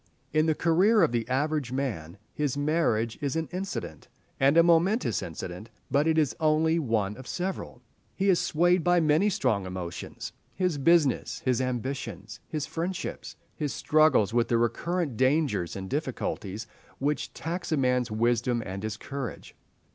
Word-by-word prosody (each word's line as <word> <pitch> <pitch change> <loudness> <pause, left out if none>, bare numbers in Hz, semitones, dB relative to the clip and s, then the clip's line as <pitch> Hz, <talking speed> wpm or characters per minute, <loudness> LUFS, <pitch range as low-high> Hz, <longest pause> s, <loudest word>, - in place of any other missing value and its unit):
In 155 +1 +3
the 160 - +2
career 185 +7 +4
of 160 - +3
the 120 0 -1
average 145 0 0
man 105 - -3 0.2
his 145 -2 -1
marriage 145 -7 +1
is 140 -1 -1
an 160 0 -1
incident, 185 - -5 0.3
and 140 +4 +4
a 170 - +8
momentous 175 +7 +3
incident; 90 +5 -7 0.2
but 145 +3 +3
it 160 0 +2
is 150 -5 +2
only 160 +1 +3
one 110 -8 0
of 130 - -10
several. 180 -8 -4 0.3
He 195 - 0
is 185 -3 +4
swayed 175 +2 +2
by 175 0 +4
many 160 +6 +3
strong 110 - 0
emotions—his 95 - -5
business, 155 -1 +2
his 130 -1 +2
ambitions, 120 -5 -4
his 155 -4 -3
friendships, 175 +4 -4 0.2
his 150 -4 -2
struggles 155 -9 +3
with 120 0 +2
the 120 - +2
recurrent 150 +4 -1
dangers 130 - +1
and 95 -1 -5
difficulties 115 -6 -3 0.3
which 145 +2 -1
tax 170 +2 -4
a 155 - +2
man's 125 -2 +1
wisdom 120 +2 +1
and 95 0 -5
his 110 0 -4
courage. 135 -3 -6
140 Hz, 155 wpm, -28 LUFS, 115-165 Hz, 0.3 s, a